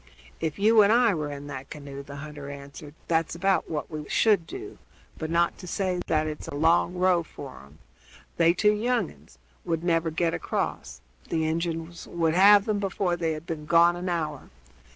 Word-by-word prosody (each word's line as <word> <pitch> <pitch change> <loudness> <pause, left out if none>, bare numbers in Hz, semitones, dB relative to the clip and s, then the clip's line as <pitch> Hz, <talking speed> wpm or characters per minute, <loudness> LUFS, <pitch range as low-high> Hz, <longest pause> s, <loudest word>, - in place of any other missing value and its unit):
"If 160 -2 -2
you 215 +2 +5
and 205 0 +5
I 235 -2 +4
were 150 -3 -3
in 140 0 -7
that 135 -2 -7
canoe," 140 -2 -8
the 140 0 -10
hunter 145 0 -8
answered, 140 +1 -10
"that's 165 0 0
about 195 +2 +1
what 155 0 -4
we 155 -1 -6
should 205 -7 +3
do; 390 +1 -8 0.4
but, 160 - -3
not 170 +1 +1
to 180 - -9
say 180 -1 -1
that 155 -1 +1
it's 155 -1 -6
a - - -6
long 165 +4 +3
row 180 -1 +3
for 65 - -10
'em, 70 +2 -18 0.6
they 170 0 +5
two 210 +3 +4
young 230 -2 0
uns 75 +1 -20 0.3
would 165 0 -2
never 165 -1 +1
get 165 +1 0
across; - - -3 0.3
the 160 -1 0
Injuns 165 +1 -3
would 165 -2 0
have 200 +3 +6
'em 210 -2 0
before 190 -2 -1
they 165 -2 -1
had 155 +1 -7
been 155 -3 -6
gone 170 +1 +5
an 180 +1 -4
hour. 155 -5 -3
165 Hz, 195 wpm, -26 LUFS, 150-185 Hz, 0.6 s, have